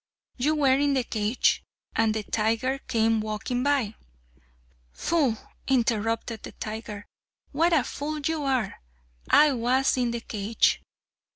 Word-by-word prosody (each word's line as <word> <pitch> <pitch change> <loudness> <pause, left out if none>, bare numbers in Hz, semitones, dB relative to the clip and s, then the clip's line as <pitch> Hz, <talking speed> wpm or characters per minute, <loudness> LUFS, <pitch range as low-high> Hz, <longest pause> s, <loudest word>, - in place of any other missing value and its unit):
You 295 +5 +1
were 275 -3 +3
in 285 -1 +2
the 260 - +2
cage, 220 +1 +1 0.3
and 225 -1 +2
the 215 - -2
tiger 230 +6 0
came 225 -3 +2
walking 215 +3 -2
by 270 -6 +1 0.5
" - - -35
"Pooh!" 290 -9 +2 0.3
interrupted 230 -3 0
the - - -9
tiger, 215 -1 -6 0.5
"what 330 +4 +2
a 310 -6 +4
fool 300 +4 -4
you 300 +1 -2
are! 260 -7 -1 0.5
I 300 -2 +6
was 255 +3 +2
in 245 -1 +1
the 235 0 -3
cage." 215 0 +1
235 Hz, 135 wpm, -26 LUFS, 220-275 Hz, 0.5 s, I